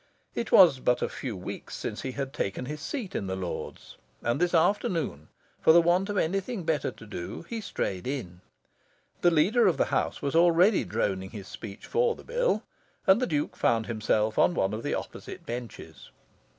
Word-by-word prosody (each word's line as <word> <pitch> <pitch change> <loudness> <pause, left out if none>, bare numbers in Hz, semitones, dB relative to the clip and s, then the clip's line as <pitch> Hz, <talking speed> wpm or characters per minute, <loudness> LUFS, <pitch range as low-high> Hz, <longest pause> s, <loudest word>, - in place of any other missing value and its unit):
It 235 - -3
was 170 -9 +7
but 125 -1 +1
a - - +1
few 120 -7 -5
weeks 90 - -7
since - - -4
he 130 - -4
had 135 0 -4
taken 100 -1 -2
his 150 +3 -6
seat 205 - -4
in 100 - -2
the 95 - -2
Lords; 95 -2 -6 0.3
and 120 +7 0
this 180 0 +2
afternoon, 165 - +1 0.3
for 160 - +6
the 170 - +8
want 180 +4 +2
of 205 - -2
anything 195 +5 -1
better 160 -2 0
to - - -12
do, 100 - -6
he 230 -1 -4
strayed 95 - -3
in. 95 -11 -5 0.8
The 175 - +6
Leader 195 +9 +4
of 180 - +2
the - - +3
House - - 0
was 140 - -2
already 175 +4 +5
droning 95 -1 -1
his 100 -3 -9
speech 105 -2 -9
for 475 0 +1
the - - -13
bill, - - 0 0.4
and 195 +3 +5
the 255 - +1
Duke 150 -3 -1
found 115 -1 +2
himself 110 -1 0
on 175 - +4
one 95 - +1
of 110 - -3
the - - -1
opposite - - -7
benches. 120 0 -7
150 Hz, 190 wpm, -28 LUFS, -, 0.8 s, the